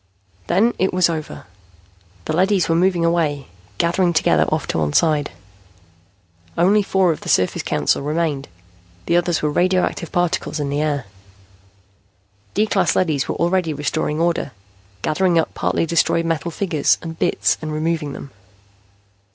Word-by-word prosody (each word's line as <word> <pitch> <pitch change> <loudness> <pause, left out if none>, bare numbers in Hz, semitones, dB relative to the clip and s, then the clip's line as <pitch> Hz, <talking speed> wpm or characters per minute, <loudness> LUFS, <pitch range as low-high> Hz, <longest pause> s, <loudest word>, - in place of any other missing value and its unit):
Then 225 - +2
it 190 - +2
was 180 -2 +3
over. 155 - -6 0.8
The - - -2
leadys 190 +1 +2
were 165 - +1
moving 175 -1 +2
away, 155 -5 0 0.3
gathering 175 +1 +1
together 155 - +3
off - - -1
to - - 0
one 75 -2 -1
side. 150 -3 +2 1.3
Only 195 +5 +4
four 190 -3 +2
of 155 - -5
the - - -7
Surface 90 0 +2
Council - - 0
remained. 150 -1 -2 0.6
The 170 - +1
others 175 -2 +1
were 150 - +1
radioactive 180 0 0
particles 175 -3 -1
in 140 -1 -2
the 145 +1 0
air. 145 -3 -1 1.5
D 210 - +3
class 205 -2 +1
leadys 155 -7 +1
were - - -2
already 170 -2 0
restoring 150 +1 -2
order, 170 -5 0 0.5
gathering 175 +1 +1
up 165 - 0
partly - - 0
destroyed 165 0 +1
metal 165 0 -1
figures 165 -4 +1
and 165 -1 -7
bits - - +1
and 155 -1 -4
removing 155 -1 -2
them. 140 - -9
165 Hz, 150 wpm, -20 LUFS, 150-175 Hz, 1.5 s, Only